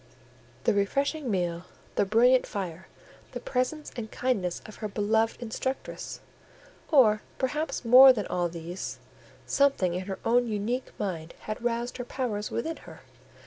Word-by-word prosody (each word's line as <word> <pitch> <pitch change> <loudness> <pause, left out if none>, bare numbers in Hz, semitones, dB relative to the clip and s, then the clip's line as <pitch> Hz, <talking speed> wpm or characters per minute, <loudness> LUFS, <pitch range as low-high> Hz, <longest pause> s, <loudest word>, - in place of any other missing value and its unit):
The - - +3
refreshing 275 +8 0
meal, 175 -3 -1 0.3
the - - +2
brilliant 245 +5 +4
fire, 185 -2 -5 0.5
the - - -4
presence 270 +4 -2
and 220 -2 -5
kindness 210 -10 -1
of 215 - -11
her 215 - -3
beloved 220 +2 +1
instructress, 245 +3 -4 0.7
or, 220 -8 +6 0.2
perhaps, 270 0 -2
more 255 +3 +10
than 215 -6 -1
all 175 -1 -1
these, 170 +2 -6 0.5
something 275 -11 +2
in 185 +2 -4
her 190 - -3
own 245 +1 +3
unique 225 +4 -2
mind, 170 -5 -4
had 215 +2 -5
roused 240 +1 -1
her 245 - -3
powers 230 -5 -3
within 320 +8 -3
her. - - -13
225 Hz, 145 wpm, -28 LUFS, 195-255 Hz, 0.7 s, more